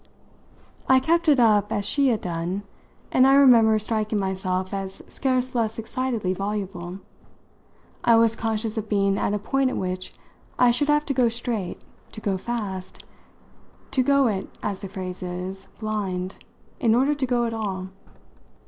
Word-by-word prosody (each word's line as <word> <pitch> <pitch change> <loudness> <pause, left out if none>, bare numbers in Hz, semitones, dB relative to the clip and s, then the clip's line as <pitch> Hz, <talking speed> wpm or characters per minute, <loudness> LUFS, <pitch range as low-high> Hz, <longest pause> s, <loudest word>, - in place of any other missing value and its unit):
I 260 0 +7
kept 335 +4 +2
it 285 -3 +5
up 210 -3 +4
as 205 - -1
she 280 +5 +2
had 230 -5 +1
done, 175 +3 -3 0.5
and 255 +1 +5
I 270 - +6
remember 235 -6 +6
striking 215 0 -1
myself 190 0 -2
as 195 -1 -5
scarce 255 -2 0
less 225 -2 -1
excitedly 225 -4 -2
voluble. 195 -2 -4 1.0
I 230 - +5
was 225 0 +4
conscious 225 0 -2
of 215 0 -7
being 195 -1 +2
at 205 - 0
a - - +1
point 265 +6 0
at - - -3
which 185 0 -3 0.5
I 245 -1 +5
should 265 +5 +1
have 295 0 +3
to 275 - -1
go 250 -3 +3
straight, 230 -5 -4 0.3
to - - -7
go 200 -2 -1
fast, 190 -3 -5 0.9
to 265 - +2
go 280 +1 +4
it, 200 -5 -1
as 195 -2 -2
the 195 - -7
phrase 185 -2 -6
is, 185 +2 -5
blind, 195 -4 -3 0.4
in 230 -5 +3
order 270 +4 +3
to 280 -2 -1
go 240 -1 +1
at 230 - -2
all. 190 -4 -3
215 Hz, 165 wpm, -24 LUFS, 190-245 Hz, 1.0 s, I